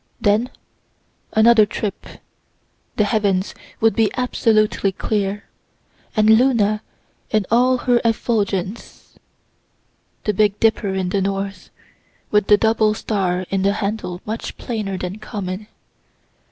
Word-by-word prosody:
Then, 215 +5 +2 0.8
another 220 -1 +6
trip, 205 -2 -5 0.9
the 210 - +2
heavens 205 -3 0 0.3
would 225 0 +3
be 220 -2 +3
absolutely 215 -5 +1
clear, 205 +1 -2 0.7
and 215 -1 +3
Luna 220 -2 +4 0.5
in 215 -3 +1
all 250 +2 +4
her 245 -1 +2
effulgence. 215 -3 -2 1.0
The 210 - 0
big 205 0 +2
Dipper 220 -3 +1
in 185 -1 -1
the 195 +1 0
north, 195 0 -3 0.6
with 210 -1 +2
the 210 - +6
double 220 -1 +2
star 185 -5 -1
in 195 -1 0
the 200 +1 +2
handle 200 -3 -3
much 220 +2 -5
plainer 210 -5 -4
than 185 +3 -5
common. 205 -2 -6
210 Hz, 115 wpm, -20 LUFS, 195-220 Hz, 1.0 s, another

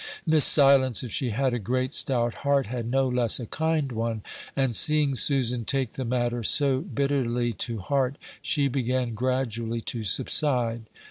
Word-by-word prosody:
Miss 160 -3 +5
Silence, 135 -4 +4
if 120 - -7
she 130 +2 -2
had 130 +3 -1
a 120 - -2
great 130 +5 -2
stout 120 -3 +1
heart, 140 -2 +1
had 120 +1 -5
no 135 +2 0
less 125 -2 +2
a 120 - -6
kind 155 +1 -2
one, 115 -2 -4 0.3
and 135 -4 0
seeing 150 0 +3
Susan 125 -2 +2
take 130 +2 -2
the 130 - -6
matter 120 0 -2
so 135 +3 +3
bitterly 135 -7 -2
to 115 +2 -2
heart, 135 +6 -2 0.2
she 145 -3 0
began 125 -2 -2
gradually 115 -1 -2
to 115 0 -4
subside. 115 - +1
125 Hz, 160 wpm, -25 LUFS, 115-140 Hz, 0.3 s, Miss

